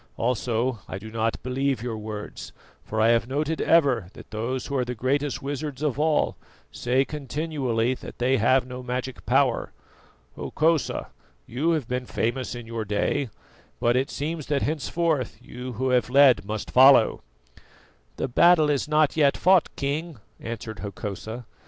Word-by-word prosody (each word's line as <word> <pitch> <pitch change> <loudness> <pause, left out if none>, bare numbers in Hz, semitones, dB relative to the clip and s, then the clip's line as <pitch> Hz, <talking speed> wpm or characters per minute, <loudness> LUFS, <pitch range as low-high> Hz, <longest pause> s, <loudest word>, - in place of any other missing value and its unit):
Also 120 0 0
I - - -5
do 110 +3 -9
not 115 0 -1
believe 130 -1 -1
your 120 -2 -3
words, 105 -1 -7 0.3
for 110 - -4
I 110 +1 +5
have 115 0 +3
noted 150 +4 -1
ever 135 - +3
that - - -13
those 120 +4 -3
who 140 - -4
are 130 - +2
the 125 0 -4
greatest 140 +5 -1
wizards 145 0 -4
of 145 -2 0
all 155 0 +2 0.4
say 130 +3 +1
continually 140 -5 -1
that - - -10
they 130 +2 +2
have 125 +3 +3
no 125 0 -7
magic 125 +1 -4
power. 130 -1 +2 0.6
Hokosa, 160 -3 0 0.3
you 140 +8 -1
have 150 -8 -1
been 125 0 -3
famous 120 +2 -2
in 120 -1 -7
your 115 -1 -4
day, 110 +6 -1 0.5
but 120 +1 +2
it 130 +2 +1
seems 155 +1 -4
that 145 -2 0
henceforth 155 -1 -1
you 125 +1 -8
who 130 +4 -1
have 125 -1 +2
led 135 -5 +5
must 105 0 -4
follow." 130 -3 +6 0.9
"The - - -2
battle 155 +3 +5
is 140 0 0
not 150 -1 +3
yet 145 -3 +3
fought, 185 -1 +4
King," 150 +2 -3 0.2
answered 115 -2 -6
Hokosa. 105 +3 -6
130 Hz, 160 wpm, -25 LUFS, 115-145 Hz, 0.9 s, follow